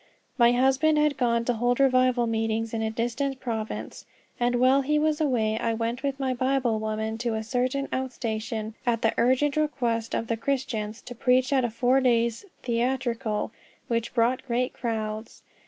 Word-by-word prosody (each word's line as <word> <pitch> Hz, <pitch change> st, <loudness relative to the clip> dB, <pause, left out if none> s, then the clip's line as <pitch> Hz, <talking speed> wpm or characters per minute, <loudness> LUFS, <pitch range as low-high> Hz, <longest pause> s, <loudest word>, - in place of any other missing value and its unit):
My 240 Hz, -2 st, +5 dB
husband 270 Hz, +5 st, +3 dB
had 300 Hz, -1 st, +3 dB
gone 235 Hz, -2 st, +1 dB
to 245 Hz, -, +1 dB
hold 245 Hz, +2 st, 0 dB
revival 255 Hz, -2 st, +3 dB
meetings 225 Hz, 0 st, -1 dB
in 225 Hz, -, -1 dB
a 220 Hz, -, 0 dB
distant 245 Hz, +4 st, -2 dB
province, 225 Hz, -4 st, -5 dB, 0.3 s
and 245 Hz, 0 st, +1 dB
while 255 Hz, +3 st, +4 dB
he 300 Hz, +3 st, +1 dB
was 305 Hz, +1 st, +1 dB
away 225 Hz, -7 st, +1 dB
I 230 Hz, -1 st, 0 dB
went 230 Hz, +2 st, -2 dB
with 275 Hz, -1 st, -2 dB
my 265 Hz, -1 st, 0 dB
Bible 255 Hz, -3 st, +1 dB
woman 220 Hz, +1 st, -3 dB
to 235 Hz, -1 st, -1 dB
a 220 Hz, -, -2 dB
certain 255 Hz, +4 st, -1 dB
out 260 Hz, 0 st, -2 dB
station 220 Hz, -1 st, -4 dB
at 235 Hz, -3 st, 0 dB
the 225 Hz, -, +3 dB
urgent 260 Hz, +4 st, +2 dB
request 240 Hz, -7 st, 0 dB
of -, -, -1 dB
the 230 Hz, 0 st, -2 dB
Christians, 230 Hz, -4 st, -3 dB
to 245 Hz, -, -8 dB
preach 255 Hz, +3 st, +2 dB
at 265 Hz, -2 st, +3 dB
a 240 Hz, -, +1 dB
four 250 Hz, +4 st, +2 dB
days' 235 Hz, -, +1 dB, 0.2 s
"theatrical," 235 Hz, -3 st, -1 dB, 0.4 s
which 230 Hz, +1 st, -1 dB
brought 240 Hz, +2 st, +2 dB
great 250 Hz, +1 st, 0 dB
crowds. 220 Hz, -2 st, -4 dB
240 Hz, 175 wpm, -26 LUFS, 225-260 Hz, 0.4 s, My